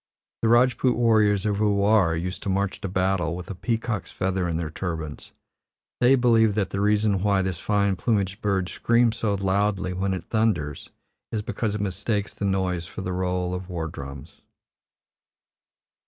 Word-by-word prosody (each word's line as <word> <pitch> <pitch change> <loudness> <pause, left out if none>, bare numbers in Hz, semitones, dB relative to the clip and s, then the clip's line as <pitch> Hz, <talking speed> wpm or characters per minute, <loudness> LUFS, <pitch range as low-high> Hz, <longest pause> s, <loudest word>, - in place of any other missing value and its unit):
The 115 - +2
Rajput 120 +1 +4
warriors 110 -4 +3
of 105 -1 0
Ulwar 100 -4 +3
used 90 +3 -4
to - - -4
march 100 +1 -1
to - - -3
battle 95 -3 0
with 90 +2 -7
a - - -3
peacock's 115 +1 -2
feather 95 -1 -1
in 85 - -2
their 80 -2 -3
turbans; 80 -4 -5 0.7
they 125 +2 +5
believe 115 -4 +3
that 105 -3 -1
the 100 - -2
reason 105 -1 +2
why 100 -1 +2
this 90 -3 -3
fine 100 -2 +1
plumaged 100 -2 -1
bird 95 -3 0
screams 115 +3 +2
so 105 -2 0
loudly 95 -1 0
when 95 +1 -1
it 90 - -7
thunders 100 -11 -1 0.4
is 105 -1 -2
because 110 -2 -2
it 105 - -3
mistakes 100 +2 -2
the 100 - -4
noise 95 -3 -1
for 100 - -7
the 90 -1 -3
roll 90 0 -1
of 90 0 -5
war 85 -3 -3
drums. 70 +1 -9
100 Hz, 170 wpm, -25 LUFS, 90-105 Hz, 0.7 s, they